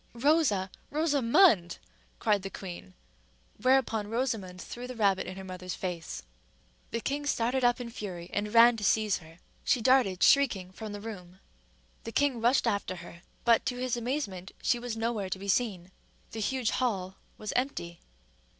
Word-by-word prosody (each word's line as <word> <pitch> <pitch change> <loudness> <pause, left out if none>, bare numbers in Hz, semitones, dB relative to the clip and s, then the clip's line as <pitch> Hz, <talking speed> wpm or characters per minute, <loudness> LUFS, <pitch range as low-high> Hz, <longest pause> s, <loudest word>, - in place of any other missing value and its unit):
"Rosa, 235 - +2 0.2
Rosa_mond!_" 285 - +4 0.4
cried 210 -3 +2
the 195 - -5
queen; 175 - -9 0.7
whereupon 250 -5 +2
Rosamond 225 -7 -2
threw 245 +6 -7
the 255 - -7
rabbit 195 -4 +2
in 185 - -7
her 190 - -7
mother's 185 -1 -6
face. 175 -4 -5 0.7
The 230 - -3
king 290 +3 -2
started 250 0 +1
up 245 0 +3
in 245 -1 -5
a - - -12
fury, 185 -7 -6
and 210 +1 -1
ran 230 +1 +7
to 210 - -6
seize 215 0 +2
her. 165 -1 -15 0.3
She 255 - +2
darted 235 -6 +3
shrieking 230 -11 +4
from 215 +2 -7
the 205 0 -6
room. 185 -4 -9 0.6
The 230 - -6
king 270 -2 +1
rushed 245 +4 +3
after 200 -2 -1
her; 170 -1 -11 0.2
but, 235 -1 +5
to 250 - -1
his 250 -1 -1
amazement, 235 -7 -3
she 240 - +2
was 240 -2 -4
nowhere 225 -4 -1
to 190 - -2
be 200 +1 -8
seen: 190 -5 0 0.4
the 225 - -6
huge 245 +1 0
hall 195 -7 -1 0.2
was 215 - -5
empty. 170 -10 -2
220 Hz, 170 wpm, -29 LUFS, 185-245 Hz, 0.7 s, ran